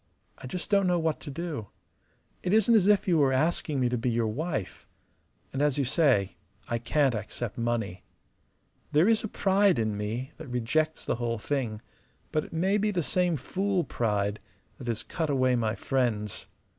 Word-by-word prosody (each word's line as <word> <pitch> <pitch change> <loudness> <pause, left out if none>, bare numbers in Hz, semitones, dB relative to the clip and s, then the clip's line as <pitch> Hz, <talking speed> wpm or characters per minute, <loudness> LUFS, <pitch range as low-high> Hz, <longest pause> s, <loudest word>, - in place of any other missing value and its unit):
I - - -8
just 180 +9 -5
don't 200 -2 +4
know 180 -1 +3
what 160 -2 0
to 150 - -8
do. 150 -7 -4 0.7
It 180 - 0
isn't 220 +1 +5
as 205 -4 +5
if 205 -1 +4
you 170 -3 +4
were 140 -2 +4
asking 150 +1 +1
me 125 - +3
to 120 -1 -1
be 125 - 0
your 115 -1 +1
wife. 115 - -3 0.7
And 135 - -1
as 145 -2 +2
you 140 - +1
say, 130 - +2 0.3
I 115 - -1
can't 135 +2 +2
accept 110 +1 -4
money. 115 -6 -2 0.9
There 155 +6 +5
is 225 0 +3
a - - -1
pride 195 -1 +3
in 110 -2 0
me 110 +6 -3
that 160 - -9
rejects 130 +6 0
the - - -1
whole 120 -1 -1
thing; 115 -2 -2 0.5
but 155 -1 +1
it - - -13
may 190 +5 +1
be 210 +1 +1
the 180 -5 0
same 180 0 +1
fool 190 +6 -1
pride 105 -5 -1 0.4
that - - -8
has 115 -2 -2
cut 160 -3 -3
away 130 -2 +3
my 110 -2 0
friends. 115 -7 -1
135 Hz, 185 wpm, -28 LUFS, 115-175 Hz, 0.9 s, isn't